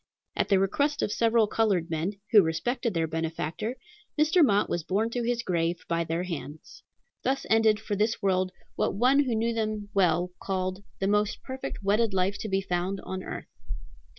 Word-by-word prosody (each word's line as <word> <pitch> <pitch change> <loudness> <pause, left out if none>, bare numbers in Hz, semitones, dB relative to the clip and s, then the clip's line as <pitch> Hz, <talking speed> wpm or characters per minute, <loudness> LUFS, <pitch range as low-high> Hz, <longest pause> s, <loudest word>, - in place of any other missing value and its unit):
At - - 0
the 195 - +5
request 285 +10 +1
of - - 0
several 230 0 +3
colored 200 -6 +1
men, 165 +5 -1 0.2
who 210 - +9
respected 215 +7 -1
their 165 -1 +2
benefactor, 165 +7 -3 0.4
Mr. 315 +3 +5
Mott 205 -6 +3
was 175 - -1
borne 205 +8 0
to 245 - -1
his 235 0 -1
grave 170 -2 -1
by 170 0 0
their 165 +2 -2
hands. 160 -4 -7 0.4
Thus 270 +1 -1
ended, 220 -1 +4
for 215 -2 -3
this 215 +3 +1
world, 185 -2 +1 0.2
what - - 0
one 255 +6 +4
who 245 -3 0
knew 230 +1 0
them 215 -2 -2
well 180 -2 +2
called 185 0 -2 0.2
"the 195 - 0
most 210 +1 +1
perfect 260 -5 -6
wedded 205 +1 +2
life 190 +2 +1
to 215 - -4
be 195 0 +1
found 185 +1 -2
on 190 0 -5
earth." - - -6
200 Hz, 180 wpm, -27 LUFS, 180-225 Hz, 0.4 s, who